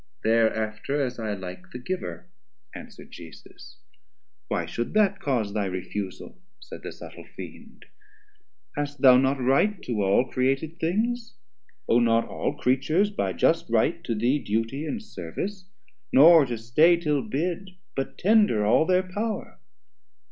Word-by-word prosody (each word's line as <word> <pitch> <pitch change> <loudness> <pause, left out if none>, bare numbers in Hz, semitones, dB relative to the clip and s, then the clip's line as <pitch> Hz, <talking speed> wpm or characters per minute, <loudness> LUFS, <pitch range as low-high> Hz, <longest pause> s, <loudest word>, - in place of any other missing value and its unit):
Thereafter 110 +3 0
as 125 -3 -2
I 110 -2 -2
like 90 -1 -9
The - - -8
giver, 180 +10 -5 0.5
answer'd - - -12
Jesus. 80 -2 -13 0.7
Why - - -1
should 120 - -4
that 200 -2 +3
Cause 120 - -1
thy 105 -2 -1
refusal, 95 - -6 0.2
said - - -11
the - - -7
subtle - - -12
Fiend, - - -11 0.9
Hast 145 0 -4
thou 130 -2 +8
not 135 +1 +1
right 140 +11 +2
to 115 -4 -2
all 100 +6 +3
Created 135 +6 -1
things, 225 +6 -1 0.5
Owe 115 - +4
not 115 -1 +2
all - - -3
Creatures 155 +11 +1
by 95 - -2
just - - +1
right - - +1
to 115 - -1
thee 120 +7 +1
Duty 115 +7 -2
and 225 +4 -4
Service, 185 - -6 0.4
nor 155 +1 +7
to 120 -1 -3
stay 150 +10 +4
till 150 -4 0
bid, 175 - -4 0.2
But 135 - -4
tender 205 - +3
all 125 +9 +4
their 185 0 +3
power? 205 - -5
135 Hz, 140 wpm, -25 LUFS, 115-180 Hz, 0.9 s, thou